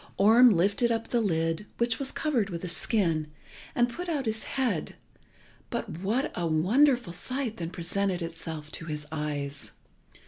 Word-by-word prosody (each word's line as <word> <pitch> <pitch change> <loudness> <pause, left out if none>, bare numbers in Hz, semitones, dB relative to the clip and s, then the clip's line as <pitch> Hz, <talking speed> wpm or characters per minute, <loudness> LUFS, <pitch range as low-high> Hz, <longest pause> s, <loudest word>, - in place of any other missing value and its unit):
Orm 230 +5 +7
lifted 200 +5 +2
up 225 0 -1
the 240 - +2
lid, 165 -1 0
which 235 -1 +1
was 275 -1 -1
covered 250 -10 0
with 170 -1 -5
a - - -2
skin, 170 -3 +1 0.5
and 240 0 +4
put 350 +9 -6
out 290 -5 -1
his 220 0 -1
head, 240 - -1 0.7
but 160 - -4
what 220 +9 0
a 175 -1 -1
wonderful 220 - +3
sight 255 +3 -2
then 165 -1 -4
presented 185 +1 -1
itself 160 -2 -6
to 165 - -5
his 150 -2 -4
eyes! 145 -2 -4
200 Hz, 160 wpm, -28 LUFS, 165-240 Hz, 0.7 s, Orm